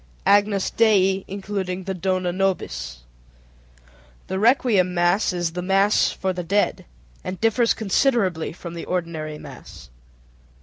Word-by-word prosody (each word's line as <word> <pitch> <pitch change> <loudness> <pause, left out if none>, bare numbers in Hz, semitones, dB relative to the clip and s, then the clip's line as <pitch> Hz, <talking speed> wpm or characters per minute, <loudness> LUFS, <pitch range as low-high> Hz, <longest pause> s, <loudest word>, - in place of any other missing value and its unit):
_ - - -29 0.2
Agnus 205 -1 +3
Dei 195 -4 +3
(including 190 -2 -4
the 190 +1 -3
Dona 185 -1 -1
nobis). 65 - -2 1.2
The 190 - -3
requiem 215 -6 +3
mass 175 +5 +2
is 175 -2 -2
the 180 +2 -4
"mass 195 +3 +3
for 190 -1 -2
the 180 -1 -4
dead" 200 +4 0 0.4
and 185 0 -5
differs 230 +1 +2
considerably 200 - +1
from 170 0 -9
the 170 - -6
ordinary 165 -4 -4
mass. - - -12
190 Hz, 130 wpm, -22 LUFS, 175-200 Hz, 1.2 s, Agnus